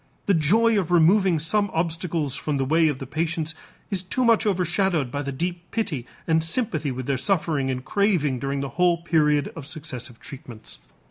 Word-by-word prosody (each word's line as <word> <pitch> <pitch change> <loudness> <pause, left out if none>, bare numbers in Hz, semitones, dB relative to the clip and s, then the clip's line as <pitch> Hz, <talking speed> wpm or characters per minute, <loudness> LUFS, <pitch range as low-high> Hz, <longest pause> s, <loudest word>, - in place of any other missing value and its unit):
The 200 - +3
joy 210 +8 +3
of 180 -4 -2
removing 175 +1 +4
some 205 +7 +1
obstacles 165 -3 -1
from 145 +2 -2
the 135 - 0
way 160 +3 +3
of 145 -4 0
the 135 - -6
patients 160 +2 -2 0.4
is 190 -3 0
too 245 +7 -1
much 230 -2 +4
overshadowed 180 -6 +1
by 145 - -2
the 140 -1 -4
deep 175 +5 -4
pity 145 - -2 0.2
and 160 -1 +2
sympathy 165 - -1
with 130 -1 -4
their 140 0 0
suffering 155 -6 0
and 130 0 -3
craving 180 - +1
during 140 +1 -2
the 140 - -3
whole 175 -1 +3
period 150 -4 +2
of 155 -4 -8
successive 135 -7 -7
treatments. 130 -6 -10
160 Hz, 185 wpm, -24 LUFS, 140-180 Hz, 0.4 s, removing